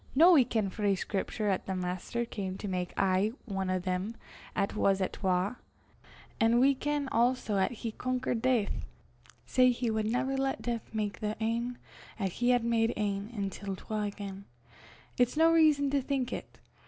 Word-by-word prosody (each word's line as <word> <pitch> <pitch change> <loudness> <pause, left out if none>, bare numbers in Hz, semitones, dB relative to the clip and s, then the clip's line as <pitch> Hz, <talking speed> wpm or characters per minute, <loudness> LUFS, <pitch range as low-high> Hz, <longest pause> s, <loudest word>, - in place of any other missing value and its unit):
Noo 335 +6 +8
we 285 -6 +7
ken 220 -5 -1
frae 205 -1 +1
Scriptur' 205 +2 -2
'at 190 - -2
the 190 - -1
Maister 185 +6 -2
cam 190 -5 -4
to 205 - -5
mak 180 -2 -2
aye 195 +3 +2
ane 195 -3 -2
o' 185 - +1
them 185 +4 -2 0.4
'at 200 - 0
was 195 -2 +2
at 190 - -1
twa; 190 +4 0 0.8
an' 230 +1 +4
we 275 +2 +5
ken 290 +1 -1
also 235 -3 +2
'at 190 - +2
he 230 -1 -5
conquered 250 0 -2
Deith; 245 -5 +1 0.6
sae 255 -1 +4
he 240 -1 0
wad 220 -1 0
never 260 +4 0
lat 270 0 0
Deith 235 -2 -4
mak 210 -2 -2
the 210 0 -2
ane 235 +2 -1 0.4
'at 195 -3 -1
he 245 +7 0
had 245 -1 +4
made 230 0 +2
ane 205 0 -1
intil 200 -3 -4
twa 215 +2 -4
again: 200 -1 -5 0.7
it's 245 +4 +2
no 325 +1 +6
rizon 305 -4 +4
to 280 -1 +2
think 265 -2 -1
it. - - -7
220 Hz, 180 wpm, -30 LUFS, 195-250 Hz, 0.8 s, Noo